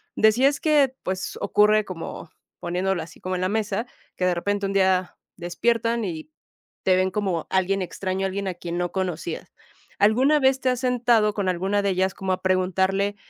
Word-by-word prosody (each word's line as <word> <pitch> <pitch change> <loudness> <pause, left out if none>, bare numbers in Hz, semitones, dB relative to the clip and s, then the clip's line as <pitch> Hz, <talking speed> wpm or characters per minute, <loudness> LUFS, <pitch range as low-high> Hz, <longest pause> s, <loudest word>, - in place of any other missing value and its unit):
Decías 255 +7 +4
que 285 -4 +3
pues, 185 +1 -4
ocurre 210 +1 +3
como 165 -2 -7 0.3
poniéndola 180 +1 -1
así 165 - -14
como 185 0 -3
en 180 - -3
la 185 - 0
mesa 220 +2 -1 0.3
que 180 - 0
de 180 - +3
repente 200 +3 -1
un 195 - -2
día 190 -2 +2 0.2
despiertan, 230 +6 0
y 160 -3 -6 0.5
te 185 -1 +4
ven 185 0 +1
como 190 -5 -1
alguien 190 +1 +1
extraño, 190 +1 -3
alguien 195 +1 -3
a 180 - -5
quien 175 0 -5
no 175 -1 -1
conocías. 175 -3 -4 0.5
¿Alguna 260 +9 +4
vez 265 0 +3
te 255 - +2
has 250 -1 0
sentado 240 -4 +2
con 195 -3 0
alguna 190 +3 0
de 200 - +1
ellas 190 0 +1
como 190 -1 -1
a - - -4
preguntarle, 190 +2 +1
195 Hz, 180 wpm, -24 LUFS, 185-215 Hz, 0.5 s, Decías